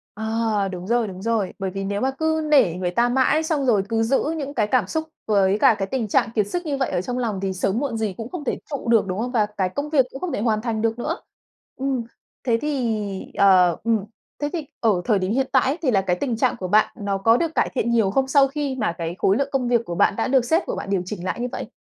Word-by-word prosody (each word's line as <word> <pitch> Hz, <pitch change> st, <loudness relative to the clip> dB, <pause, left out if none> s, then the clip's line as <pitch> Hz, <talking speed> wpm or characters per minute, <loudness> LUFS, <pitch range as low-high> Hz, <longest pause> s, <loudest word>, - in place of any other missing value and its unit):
À! 220 Hz, -1 st, 0 dB
Đúng 180 Hz, +1 st, -7 dB
rồi, 235 Hz, -1 st, +1 dB
đúng 190 Hz, -1 st, -8 dB
rồi. 225 Hz, -3 st, -1 dB
Bởi 195 Hz, -, -2 dB
vì 195 Hz, 0 st, -4 dB
nếu 200 Hz, +1 st, -2 dB
mà 265 Hz, +1 st, +1 dB
cứ 315 Hz, +3 st, 0 dB
nể 265 Hz, -, +5 dB
người 180 Hz, -1 st, -2 dB
ta 235 Hz, +6 st, +2 dB
mãi 265 Hz, +5 st, +2 dB
xong 310 Hz, -4 st, 0 dB
rồi 210 Hz, -6 st, +3 dB
cứ 225 Hz, 0 st, +1 dB
giữ 255 Hz, +4 st, +2 dB
những 285 Hz, -1 st, -4 dB
cái 215 Hz, -6 st, +1 dB
cảm 255 Hz, +3 st, +2 dB
xúc 315 Hz, -1 st, -2 dB, 0.2 s
với 200 Hz, -2 st, +3 dB
cả -, -, +5 dB
cái 195 Hz, -, -1 dB
tình 255 Hz, -5 st, -2 dB
trạng 210 Hz, -, +2 dB
kiệt 210 Hz, -2 st, +2 dB
sức 350 Hz, +9 st, -3 dB
như 290 Hz, -3 st, -1 dB
vậy 265 Hz, -, 0 dB
ở -, -, 0 dB
trong 245 Hz, +6 st, -4 dB
lòng 225 Hz, -6 st, -2 dB
thì 195 Hz, -1 st, -1 dB
sớm 190 Hz, +4 st, 0 dB
muộn 260 Hz, -5 st, -2 dB
gì 215 Hz, -3 st, -1 dB
cũng 225 Hz, +1 st, -6 dB
không 340 Hz, -1 st, -6 dB
thể 265 Hz, -, -1 dB
trụ 280 Hz, -5 st, -5 dB
được, 225 Hz, -3 st, +4 dB
đúng 185 Hz, +1 st, -3 dB
không? 245 Hz, +2 st, -2 dB
Và 220 Hz, -4 st, +2 dB
cái 190 Hz, -2 st, +1 dB
công 285 Hz, +9 st, -4 dB
việc 285 Hz, -4 st, +4 dB
cũng 270 Hz, -, -8 dB
không 365 Hz, -, -2 dB
thể -, -, -2 dB
hoàn 215 Hz, -2 st, +1 dB
thành 225 Hz, -2 st, -2 dB
được 225 Hz, +1 st, 0 dB
nữa. 325 Hz, +8 st, -2 dB, 0.6 s
Ừm, 265 Hz, -2 st, -1 dB, 0.4 s
thế 235 Hz, -3 st, +2 dB
thì 225 Hz, -9 st, -2 dB
ờ, 185 Hz, -3 st, +5 dB
ừm, 225 Hz, -3 st, +1 dB, 0.4 s
thế 290 Hz, -, 0 dB
thì 325 Hz, -4 st, -3 dB
ở 210 Hz, -6 st, +2 dB
thời 215 Hz, -5 st, +2 dB
điểm 185 Hz, +1 st, -1 dB
hiện 265 Hz, +3 st, +1 dB
tại 265 Hz, -, +4 dB
ấy, 275 Hz, +4 st, 0 dB
thì 275 Hz, -6 st, +1 dB
là 195 Hz, -4 st, +3 dB
cái 180 Hz, -2 st, 0 dB
tình 235 Hz, +5 st, -2 dB
trạng 255 Hz, +1 st, +1 dB
của 185 Hz, -, -4 dB
bạn 210 Hz, +4 st, +3 dB
nó 200 Hz, -1 st, -1 dB
có 225 Hz, +5 st, +4 dB
được 330 Hz, -1 st, -2 dB
cải -, -, +2 dB
thiện 235 Hz, -, 0 dB
nhiều 220 Hz, -5 st, +2 dB
không, 265 Hz, +4 st, +1 dB
sau 275 Hz, 0 st, +5 dB
khi 280 Hz, -1 st, -3 dB
mà 215 Hz, -8 st, 0 dB
cái 170 Hz, 0 st, -4 dB
khối 195 Hz, +2 st, +3 dB
lượng 280 Hz, 0 st, 0 dB
công 265 Hz, -3 st, 0 dB
việc 235 Hz, -1 st, +2 dB
của 170 Hz, -, -4 dB
bạn -, -, +3 dB
đã 225 Hz, -, -1 dB
được 260 Hz, -2 st, +3 dB
sếp 325 Hz, +8 st, +2 dB
của -, -, -3 dB
bạn -, -, -6 dB
điều 195 Hz, -2 st, +1 dB
chỉnh 185 Hz, -1 st, -6 dB
lại 185 Hz, -, -2 dB
như 245 Hz, -, -1 dB
vậy? -, -, -5 dB
230 Hz, 285 wpm, -23 LUFS, 200-265 Hz, 0.6 s, nể